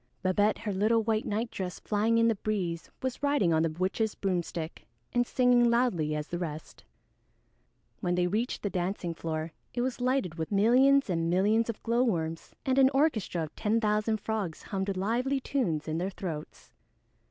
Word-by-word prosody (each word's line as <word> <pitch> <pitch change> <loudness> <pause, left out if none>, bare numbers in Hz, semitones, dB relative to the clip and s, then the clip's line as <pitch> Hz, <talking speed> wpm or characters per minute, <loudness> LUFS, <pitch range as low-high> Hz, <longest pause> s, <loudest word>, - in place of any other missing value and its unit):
Babette, 205 +3 +2
her 215 -3 -3
little 220 +4 +2
white 220 0 0
nightdress 210 -4 -3
flying 220 +2 +1
in 230 0 +4
the 230 - +4
breeze, 190 -6 -3
was 260 +1 -3
riding 285 - +2
on 160 - +3
the 165 - +2
witch's 190 +7 -1
broomstick 175 -4 -3 0.3
and 245 0 +2
singing 245 -1 +4
loudly 195 -11 +1
as 150 0 -4
the 175 - -3
rest. 155 -3 -6 1.2
When 175 0 0
they 180 0 +2
reached 215 +7 -1
the 205 - -1
dancing 180 -1 -2
floor 160 0 -4 0.2
it 240 - 0
was 255 0 -2
lighted 245 -10 0
with 160 - -3
millions 255 +7 +5
and 165 -3 0
millions 210 +6 +2
of 225 - -5
glowworms, 205 -10 0
and 265 0 +2
an 265 -1 +7
orchestra 225 - +1
of 155 - -8
ten 220 +1 +1
thousand 215 0 +1
frogs 205 -6 -3
hummed 195 -1 -3
lively 245 +8 0
tunes 215 - -1
in 160 +1 -1
their 185 +2 -1
throats. 165 -6 -7
205 Hz, 170 wpm, -29 LUFS, 175-235 Hz, 1.2 s, an